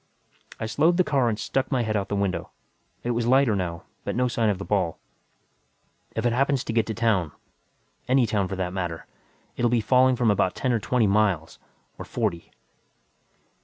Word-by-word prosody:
I - - -3
slowed 155 +11 +2
the 185 - +5
car 135 -7 +1
and 105 - -2
stuck 135 +5 -2
my 130 -3 +1
head 110 -1 -2
out 100 -2 -1
the 100 - -1
window. 95 -4 -1 0.5
It 120 - -1
was 120 0 -1
lighter 130 -3 +4
now, 85 -3 -3 0.2
but - - -3
no 125 +1 +2
sign 115 -2 +1
of 100 - 0
the 100 - -7
ball. 95 -6 0 1.2
"If 110 - -2
it 120 - +2
happens 135 +1 +1
to 115 - -4
get 115 -1 +1
to 110 - -3
town 100 -9 +1 0.7
any 130 -1 +4
town, 105 -3 0
for 95 - -4
that 90 -1 -3
matter 85 -3 -4 0.5
it'll 120 0 +2
be 120 0 +2
falling 130 +3 +4
from 120 -3 +2
about 100 -2 +1
ten 130 - 0
or 115 - +1
twenty 120 +1 +1
miles. 100 -6 +1 0.4
Or - - -6
forty." 85 0 -3
110 Hz, 195 wpm, -25 LUFS, 95-125 Hz, 1.2 s, the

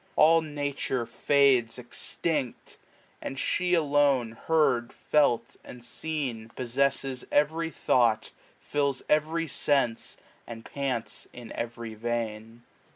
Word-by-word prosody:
All 165 +1 +6
Nature 145 -5 -2
fades 135 -4 +3
extinct; 130 +2 -3 0.4
and 135 - -5
she 180 +5 +1
alone 145 -6 +3
loia - - -14
Heard, 140 -7 +2
felt, 125 -6 +1
and 120 -1 -11
seen, 130 -6 -4
possesses 135 +1 0
every 160 +3 +2
thought. 120 -7 +2 0.3
Fills 140 -3 -1
every 155 +2 +2
sense> 135 -6 0 0.3
and 115 -1 -8
pants 135 -5 -3
in 120 -2 -10
every 115 -1 -5
vein. 115 0 -4
135 Hz, 105 wpm, -28 LUFS, 120-150 Hz, 0.4 s, All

